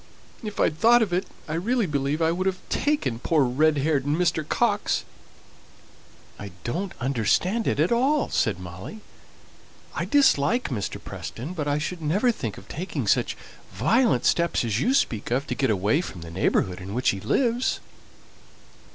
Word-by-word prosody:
If 210 -2 -6
I'd 155 0 +1
thought 235 +1 +6
of 190 -5 -3
it, 180 - 0 0.2
I 155 - -4
really 225 +8 +1
believe 145 0 -1
I 160 - +3
would 185 +3 -1
have 190 -1 0
taken 285 - 0
poor 155 +2 +2
red 150 +5 +2
haired 140 -1 +1
Mr. 160 +2 +1
Coxe." 205 +6 0 1.3
"I 100 - -6
don't 175 +10 -3
understand 140 - +1
it - - 0
at 160 +7 +2
all," 270 +5 +2
said 105 -5 +1
Molly. 90 - -9 0.9
"I - - -2
dislike 250 - +3
Mr. 110 -7 -3
Preston, 135 +10 -7
but 150 -5 -3
I 145 0 +1
should 170 +3 -4
never 195 +11 +2
think 115 - -5
of 95 - -13
taking 155 - -4
such - - +1 0.4
violent 135 - +2
steps 170 -7 +2
as 110 -1 0
you 260 - +2
speak 110 - 0
of, 130 +4 0
to - - -3
get 135 - 0
away 105 - +2
from 90 - -8
the 85 0 -9
neighbourhood 90 +1 0
in 95 +3 -6
which 125 - +2
he 100 - -1
lives." 245 - +1
155 Hz, 170 wpm, -25 LUFS, 120-200 Hz, 1.3 s, thought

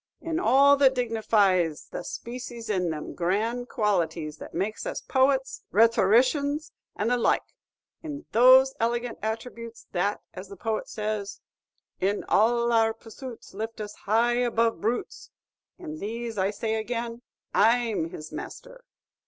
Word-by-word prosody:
In 330 -1 -2
all 280 -3 +5
that 265 -1 +5
dignifies 210 -9 +1
the - - -5
spacies 235 -2 -6
in 180 -4 0
them 155 -2 -5
grand 220 +8 -1
qualities 165 -7 -1
that - - -10
makes 200 +5 -3
us - - -3
poets, 265 0 +1
rhetoricians, 255 +8 +3 0.2
and 210 - -1
the 245 - +3
like, 240 - +2 0.6
in 295 -2 -7
those 260 +3 +7
elegant 235 +1 -1
attributes 230 +1 -5
that, 195 +3 0
as 185 +1 -8
the 200 - -10
poet 220 +2 -3
says, 210 -2 -4 0.6
"In 200 +2 0
all 235 +2 +3
our 225 -1 +3
pursuits 230 +2 -10
Lifts 220 +3 -5
us 210 -1 -5
high 235 +4 +1
above 230 -1 +1
brutes,'" 230 +4 -3 0.5
in 315 -4 -7
these, 230 +2 -4
I 190 -1 +1
say 220 +2 -2
again, 230 +1 -3 0.3
I 235 +3 +4
'm 165 -6 -2
his 155 -1 -9
master!'" - - -9
230 Hz, 140 wpm, -26 LUFS, 205-245 Hz, 0.6 s, those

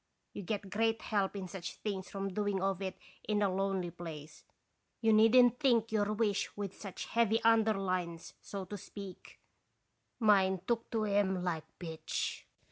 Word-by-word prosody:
You - - -5
get 200 0 -4
great 225 +2 +1
help 200 -2 0
in 190 -2 -4
such 180 0 -6
things 195 -3 -4
from 195 -1 -4
doing 205 -1 0
of 195 0 0
it 190 -1 -3 0.3
in 210 -1 +2
a 195 -2 +2
lonely 190 -2 -1
place; 155 -3 -9 0.6
you 225 -1 +4
needn't 240 +3 +6
think 235 -6 +3
your 210 -1 +1
wish 210 -3 0
with 200 -2 -4
such 195 -3 -6
heavy 230 -1 +2
under 225 -1 +5
lines, 180 -3 -2
so 195 -2 -6
to 205 +3 -6
speak; 195 -1 -10 0.8
mine 190 -5 +4
took 235 -1 -1
to 225 -2 0
'em 200 -3 +1
like 165 -3 -2
pitch. 160 -3 -4
200 Hz, 160 wpm, -33 LUFS, 185-220 Hz, 0.8 s, needn't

